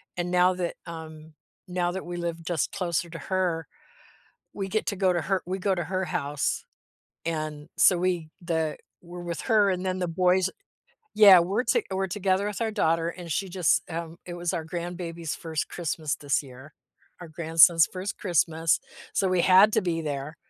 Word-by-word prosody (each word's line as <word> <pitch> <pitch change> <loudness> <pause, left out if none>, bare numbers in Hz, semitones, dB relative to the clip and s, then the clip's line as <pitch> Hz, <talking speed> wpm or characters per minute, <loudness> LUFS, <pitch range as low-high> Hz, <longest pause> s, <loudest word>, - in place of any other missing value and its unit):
and 175 0 -3
now 180 +1 +4
that, 180 -1 -3
um, 160 -2 -9 0.3
now 180 -1 -1
that 190 +1 -5
we 175 - -5
live 170 -1 -4
just 165 -3 -1
closer 170 -1 -2
to 165 - -8
her, 180 -2 -1 0.9
we 195 -1 -4
get 215 +3 -1
to 200 - -1
go 185 -1 +3
to 175 - 0
her 190 0 0
we 185 +2 -3
go 195 +1 +1
to 175 -2 -3
her 185 +1 -2
house. 145 -2 -2 0.6
And 155 -1 -4
so 180 - +6
we 175 -3 -1
the 160 -3 -1 0.2
were 175 0 -9
with 170 -1 -4
her 210 -3 +3
and 185 0 -2
then 185 0 -1
the 180 - -1
boys 180 +2 +2 0.7
teah, 200 -4 +9
we're 200 +8 -1
to 230 - +2
we're 190 0 -1
together 190 +1 0
with 210 +1 -4
our 225 -1 0
daughter 165 -5 +1
and 175 -1 -7
she 195 +5 -1
just, 180 -3 +2
um 165 0 -5
it 175 - -6
was 175 0 -2
our 170 -3 -3
grandbaby's 170 -1 -5
1st 160 -2 -4
Christmas 155 -3 -2
this 145 +1 0
year, 135 +2 -13 0.5
our 175 - -9
grandson's 165 +1 +5
1st 190 +3 -6
Christmas, 165 -3 +1 0.3
so 195 - +2
we 185 -1 +2
had 195 +4 +6
to - - +3
be 170 -2 -1
there, 145 0 -4
175 Hz, 185 wpm, -26 LUFS, 165-185 Hz, 0.9 s, teah